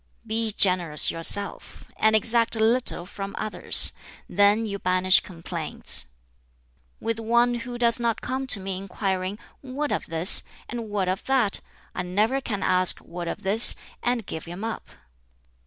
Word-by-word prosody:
"Be 225 0 -2
generous 180 -7 +3
yourself, 200 +5 0
and 220 0 +2
exact 230 +2 +4
little 225 -4 0
from 200 +1 -8
others; 215 - +1 0.4
then 205 +2 +2
you 200 -2 -5
banish 185 0 +3
complaints. 165 -2 -3 0.9
"With 230 0 -4
one 235 +2 +1
who 240 +1 -6
does 235 0 +1
not 235 -1 -1
come 260 +1 -5
to 220 - +2
me 190 -1 -5
inquiring 190 0 -4 0.2
'What 275 +2 -5
of - - -3
this?' 165 +3 +4 0.3
and 230 -2 -7
'What 200 -3 -2
of 185 +3 -3
that?' 255 -7 +1 0.3
I - - -4
never 210 +9 -1
can 205 -6 -4
ask 185 0 +5
'What 175 0 -9
of - - -6
this?' 205 +5 +6 0.3
and 240 -3 -2
give 160 - -7
him 175 +4 -9
up. 225 -1 -6
210 Hz, 150 wpm, -24 LUFS, 185-235 Hz, 0.9 s, this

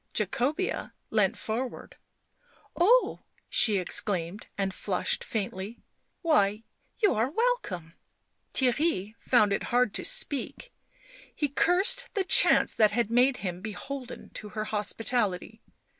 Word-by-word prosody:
Jacobean 260 - -1 0.2
leant 210 -4 +1
forward. 240 +4 -5 0.4
" - - -33
Oh 470 +9 +3
!" - - -35
she 220 -4 +5
exclaimed, 185 0 -1
and 195 -1 -1
flushed 190 -1 -1
faintly. 205 +1 -5 0.2
" - - -47
Why, 215 -10 +2 0.3
you 415 -3 +2
are 225 +4 0
welcome." 290 - -2 0.6
Theirry 250 - 0
found 210 -5 +3
it - - -2
hard 245 -3 +1
to - - -1
speak; 290 - -2 0.6
he 295 - 0
cursed 380 - +3
the 395 - +1
chance 375 - +5
that 215 -1 +4
had 235 -1 -1
made 250 +2 +3
him 180 0 -4
beholden 250 +5 -7
to 210 - -8
her 215 +1 -4
hospitality. 215 0 -1
225 Hz, 130 wpm, -27 LUFS, 200-285 Hz, 0.6 s, she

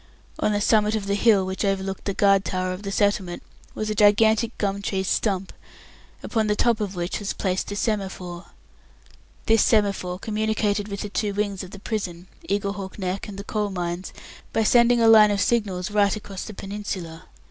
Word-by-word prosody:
On - - +1
the 205 - +1
summit 215 0 +3
of 210 -2 -2
the 200 - 0
hill 205 -2 +4
which 190 +2 -3
overlooked 195 -1 -2
the 200 - -2
guard 195 -1 +4
towers 185 -2 -2
of 185 - -7
the 200 -1 -5
settlement 195 -3 0 0.3
was 215 - -3
a 215 - -1
gigantic 220 +2 +3
gum 200 -1 -1
tree 190 -1 -1
stump, 190 -1 -1 0.7
upon 220 -2 0
the 210 - +2
top 230 0 +2
of 200 -2 -3
which 175 +1 -3
was 205 -1 -3
placed 190 0 -2
a - - -3
semaphore. 190 -5 -3 1.0
This 225 -1 +4
semaphore 200 -4 +1
communicated 210 0 -1
with 200 -1 -5
the 210 - -4
two 200 +1 -2
wings 205 -2 -2
of 185 - -9
the 200 - -10
prison 190 -5 -4 0.2
Eaglehawk 200 -1 -2
Neck 190 +1 -3
and 200 -2 -8
the 200 - -6
Coal 210 0 -2
Mines 175 -1 -4 0.4
by 225 - +1
sending 240 +2 +5
a 230 - +4
line 215 -1 +8
of 205 -1 0
signals 200 -3 0
right 205 -1 +3
across 200 -2 -7
the 215 - -8
peninsula. 195 -5 -6
200 Hz, 190 wpm, -24 LUFS, 190-215 Hz, 1.0 s, line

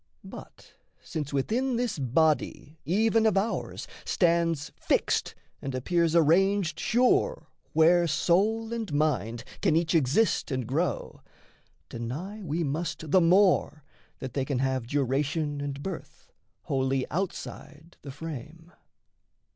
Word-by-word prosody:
But - - -12 0.3
since 150 -5 -4
within 235 - 0
this 235 -8 -1
body 150 +2 0
even 220 +6 +3
of 205 -3 +2
ours 215 +3 -2 0.2
Stands 165 -4 +1
fixed - - 0 0.3
and 135 -1 -4
appears 170 +5 +1
arranged 170 +1 +3
sure 255 - +2 0.2
Where 170 +2 +5
soul 215 +8 +1
and 225 -6 -4
mind 145 -6 0 0.2
can 155 - +3
each 165 0 +1
exist 165 - +2
and 130 -3 -2
grow, 150 +8 -2 0.7
Deny 150 - -6
we 170 -2 -2
must 155 +1 -3
the 185 - +6
more 175 -4 +3 0.3
that 130 -2 -7
they 135 - 0
can 135 -1 -2
have 130 -2 -1
Duration 145 +2 -1
and 140 0 -5
birth, 190 -4 -8 0.3
wholly 135 -1 0
outside 165 -2 -5
the 140 - -9
frame. 160 +3 -8
160 Hz, 120 wpm, -27 LUFS, 140-185 Hz, 0.7 s, the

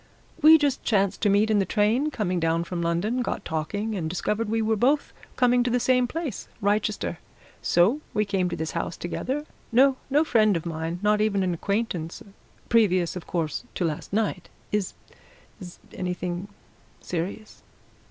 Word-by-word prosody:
"We 315 +2 +9
just 285 -3 0
chanced 200 -3 +1
to 210 - +3
meet 205 +2 +3
in 210 - +4
the - - +3
train 220 +9 +1
coming 185 -10 -1
down 165 0 +1
from 170 0 -4
London, 175 +9 0
got - - -3
talking, 205 +8 -2
and 170 -6 -2
discovered 210 +5 -1
we 225 +1 +1
were 220 0 +1
both 275 +7 +1 0.2
coming 245 -1 +4
to 245 - +1
the 245 +1 +2
same 250 0 +3
place 305 - -4
Wrychester. 205 -4 0 0.4
So 205 - +3
we 210 - +1
came 190 -3 0
to 170 - -3
this 160 -1 -3
house 170 0 -3
together. 265 +11 -3 0.3
No 260 +3 +5
no 290 +3 +4
friend 215 - +3
of 165 - -7
mine 165 +1 -3
not 210 0 +3
even 200 -2 +1
an 180 -1 0
acquaintance 180 -3 -2 0.4
previous, 185 -7 +3
of 180 - -7
course, 165 +1 -2
to 180 - 0
last 155 -3 -4
night. 205 -3 -1 0.2
Is 205 -3 -1 0.6
is 175 -3 -10
it - - -14
anything 180 0 -3 0.5
serious?" 185 +5 -5
205 Hz, 170 wpm, -25 LUFS, 175-230 Hz, 0.6 s, We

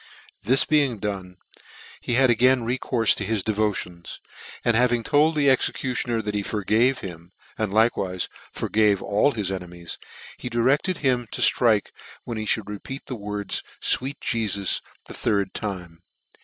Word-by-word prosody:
This 130 +6 +4
being 145 -6 +2
done, 95 -3 -5 0.6
he 120 - -1
had 130 -1 +5
again 125 +1 +3
recourfe 120 -2 +2
to - - -2
his 105 -1 -1
devotions, 100 -5 -2 0.5
and 120 - +3
having 120 0 +3
told 150 +6 +3
the 145 -2 +2
executioner 125 -3 +1
that 105 0 -3
he 105 - 0
forgave 110 +6 +1
him, 85 -2 -9 0.2
and 110 -3 -2
like 110 +3 +3
wife 90 -1 -2 0.2
forgave 105 -2 +1
all 105 +8 +2
his 100 -4 -2
enemies, 90 -2 -7 0.4
he 125 - -5
directed 135 +10 +1
him 125 -2 +2
to - - -5
ihike 110 -5 +4 0.3
when 115 -2 -5
he 110 - -4
mould 110 - -9
repeat 105 +7 -7
the 130 - -5
words 105 -1 -3
" - - -28
fweet 135 +2 0
" - - -46
Jefus" 100 -5 0 0.2
the - - -10
third 100 -2 0
time. 90 -5 -6
110 Hz, 160 wpm, -24 LUFS, 100-125 Hz, 0.6 s, had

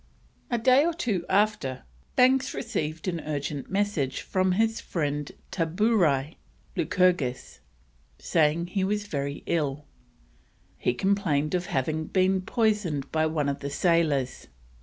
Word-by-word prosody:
A 240 - +1
day 255 +4 +5
or 335 0 0
two 215 - -1
after, 195 -10 +1 0.3
Banks 260 +1 +4
received 160 - -3
an 170 -2 -1
urgent 145 -2 -4
message 190 -10 -1
from 185 -1 +1
his 225 +3 +1
friend 145 -3 -2 0.2
Taburai 165 - +1 0.4
(Lycurgus), 170 - +1 0.6
saying 160 - +1
he 190 +2 -2
was 205 +2 -1
very 140 -5 -4
ill. 150 -3 -1 0.9
He 125 - 0
complained 165 - +1
of 180 -1 -1
having 155 +4 -1
been 185 +2 +2
poisoned 195 - 0
by 160 0 +2
one 155 -2 -1
of 140 -1 -2
the 140 - -4
sailors. 150 -4 +1
170 Hz, 125 wpm, -27 LUFS, 145-205 Hz, 0.9 s, day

